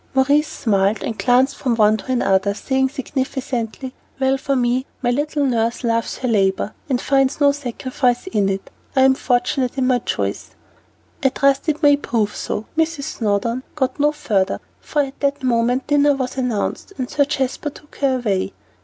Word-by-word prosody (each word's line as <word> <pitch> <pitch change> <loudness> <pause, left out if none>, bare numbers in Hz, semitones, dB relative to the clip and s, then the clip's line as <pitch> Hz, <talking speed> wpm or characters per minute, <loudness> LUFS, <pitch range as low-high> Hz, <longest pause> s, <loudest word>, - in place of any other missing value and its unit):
Maurice 285 +3 +3
smiled, 200 -1 0
and 225 - -3
glanced 255 +2 +3
from 250 -4 0
one 215 -1 +4
to 255 +5 -3
the 245 - 0
other, 195 +1 +2
saying 265 +3 0
significantly, 260 -2 -3 0.3
"Well 265 0 +3
for 275 0 -1
me 245 0 +2
that 260 - -15
my 245 - +2
little 290 +2 0
nurse 235 -1 0
loves 230 -1 0
her 255 - -3
labor, 200 -2 +1 0.2
and 255 -2 +1
finds 270 +1 +1
no 285 -1 +5
sacrifice 255 -2 -1
in 205 -3 +1
it. 195 0 -4 0.2
I 265 - +4
am 265 0 +6
fortunate 250 0 0
in 260 - +1
my 255 -1 +3
choice." - - -3 0.7
"I 270 - +4
trust 275 +3 +1
it 310 +1 -1
may 290 -1 +6
prove 225 -7 -1
so 210 - -3
" - - -32
Mrs. 320 -2 0 0.2
Snowdon 225 +3 0
got 270 -1 -1
no 295 +1 +4
further, 210 -11 0 0.2
for 295 -1 0
at 275 0 -8
that 280 0 -1
moment 245 +1 +1
dinner 290 -1 +3
was 260 -2 -3
announced, 250 - -2
and 255 -2 -2
Sir 285 - +2
Jasper 275 +1 -2
took 295 +1 -16
her 275 -2 +2
away. 205 -7 -1
260 Hz, 185 wpm, -20 LUFS, 230-275 Hz, 0.7 s, am